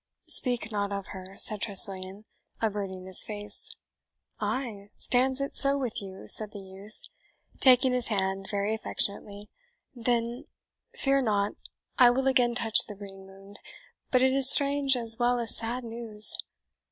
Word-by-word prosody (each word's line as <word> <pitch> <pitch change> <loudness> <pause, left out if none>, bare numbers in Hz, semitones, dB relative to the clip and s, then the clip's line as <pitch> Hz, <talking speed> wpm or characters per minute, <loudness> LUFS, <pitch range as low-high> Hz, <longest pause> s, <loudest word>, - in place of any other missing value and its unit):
"Speak 245 -3 +2
not 205 -1 -3
of 200 -1 -6
her!" 190 0 -11
said 210 -2 +3
Tressilian, 195 -1 0 0.3
averting 200 -4 -5
his 190 -1 +4
face. 205 -1 -2 0.7
"Ay, 215 -6 -5
stands 260 +1 0
it 275 0 -5
so 275 0 +7
with 250 -7 0
you?" 190 -1 -11
said 215 -1 0
the 205 - -9
youth, 195 +2 -14 0.6
taking 255 0 +4
his 250 -2 -1
hand 195 -2 -3
very 205 +1 -2
affectionately; 205 -1 -5 0.4
"then, 240 0 -3 0.5
fear 275 - 0
not 205 -4 -1 0.5
I 250 -1 +7
will 260 +2 -1
again 245 -2 +1
touch 225 -2 +1
the 210 - -9
green 195 -1 -13
wound. 195 +1 -16 0.5
But 255 -1 +2
it 260 0 +2
is 270 -1 +8
strange 280 -1 +5
as 225 -2 +1
well 245 0 +1
as 235 -2 -1
sad 240 +3 -4
news. 225 -2 +1
220 Hz, 150 wpm, -26 LUFS, 200-250 Hz, 0.7 s, is